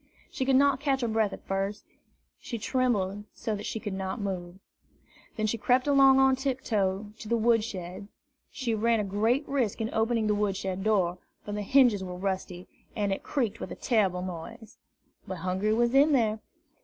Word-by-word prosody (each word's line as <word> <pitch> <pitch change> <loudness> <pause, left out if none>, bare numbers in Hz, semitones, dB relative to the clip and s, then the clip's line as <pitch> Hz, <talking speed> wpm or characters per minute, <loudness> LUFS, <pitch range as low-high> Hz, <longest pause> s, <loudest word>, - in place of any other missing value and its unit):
She 260 - -2
could 265 0 +3
not 275 -1 +4
catch 275 -2 0
her 240 - 0
breath 220 -2 +1
at - - -10
first, 195 +2 -2
and - - -36 0.4
she 235 - -5
trembled 205 -5 0
so 225 -2 -3
that 205 - -6
she 220 - -3
could 210 -3 -5
not 190 +4 -4
move. 185 -3 -4 0.8
Then 215 - -1
she 220 +2 -1
crept 250 +3 +2
along 275 -2 +6
on 265 0 +5
tiptoe 215 -7 -1
to 215 - -8
the 235 - +2
wood 225 -1 +3
shed. 185 -1 -6 0.4
She 240 -3 -2
ran 225 +1 +2
a - - 0
great 220 +8 0
risk 255 -7 -1
in 225 0 -3
opening 225 0 +1
the 210 - +2
wood 205 -2 0
shed 190 -1 -3
door, 185 -5 +1 0.3
for 210 - -5
the 210 0 -3
hinges 235 -3 +4
were 180 -1 -6
rusty, 185 -1 -4 0.3
and 205 -2 0
it - - -4
creaked 230 -6 -2
with - - -6
a - - -5
terrible 195 -7 +1
noise. 185 +6 -8 0.5
But 190 - -4
Hungry 190 +4 +1
was 235 +1 +2
in 285 +3 +5
there. 220 -4 +2
215 Hz, 195 wpm, -28 LUFS, 195-245 Hz, 0.8 s, along